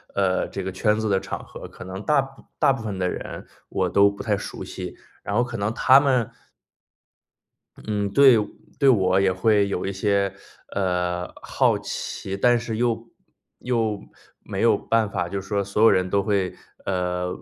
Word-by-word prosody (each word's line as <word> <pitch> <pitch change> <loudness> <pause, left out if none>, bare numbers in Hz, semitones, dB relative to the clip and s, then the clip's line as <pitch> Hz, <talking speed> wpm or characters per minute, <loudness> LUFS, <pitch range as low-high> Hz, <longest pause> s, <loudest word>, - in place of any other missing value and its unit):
呃， 95 -2 +1
这 95 - -5
个 95 - -3
圈 105 +3 +1
子 110 -1 -1
的 95 - +2
场 - - -6
合， - - -10
可 - - -11
能 95 +1 -7
大 150 -2 +4
部 135 0 -12
大 145 -3 +4
部 135 - -3
分 105 -4 -4
的 90 -1 0
人， - - -6 0.2
我 - - -1
都 100 0 +5
不 100 - -8
太 105 -3 +1
熟 - - -7
悉， - - -7 0.3
然 - - -4
后 120 - +3
可 120 -1 -5
能 105 +2 -1
他 130 +3 +6
们 130 -5 +1 1.5
嗯， 105 -2 -1
对 135 -1 +7 0.4
对 140 -2 +5
我 95 -5 +4
也 95 -1 +3
会 100 +1 +2
有 95 - -2
一 100 - -1
些 100 0 +1 0.4
呃， 90 -2 -1
好 - - +2
奇， 95 - -5
但 120 +3 +4
是 115 -1 -4
又 115 -1 0 0.5
又 115 -4 -1 0.4
没 - - -4
有 - - +5
办 115 -2 +1
法 90 -3 -2
就 100 +1 -3
说， 100 +1 -1
所 100 +2 -2
有 115 - +8
人 95 0 +2
都 100 +1 +2
会， 100 -3 0 0.3
呃， 90 -1 -1
100 Hz, 195 characters per minute, -24 LUFS, 95-115 Hz, 1.5 s, 有